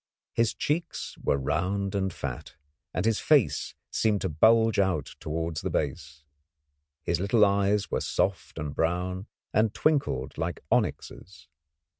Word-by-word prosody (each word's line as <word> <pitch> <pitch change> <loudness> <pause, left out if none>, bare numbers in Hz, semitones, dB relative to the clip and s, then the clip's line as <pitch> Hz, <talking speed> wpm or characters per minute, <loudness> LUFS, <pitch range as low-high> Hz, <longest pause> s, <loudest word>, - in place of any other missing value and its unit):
His 115 -1 +1
cheeks 165 +3 -2
were - - +2
round 95 +8 -1
and 95 -1 0
fat, 70 -7 -6 0.4
and 90 - -2
his 115 -2 +2
face 145 -8 +2 0.2
seemed 105 -3 +1
to - - -1
bulge 110 +7 +4
out 90 -7 0
towards 80 +1 -3
the - - -2
base. 75 0 -3 0.8
His 85 - 0
little 105 +3 +4
eyes 100 -1 +1
were - - 0
soft 95 -5 -1
and 75 -2 -4
brown 90 +5 -1 0.3
and 110 0 +2
twinkled 140 - 0
like 80 0 -3
onyxes. 80 -6 -2
95 Hz, 135 wpm, -28 LUFS, 80-110 Hz, 0.8 s, bulge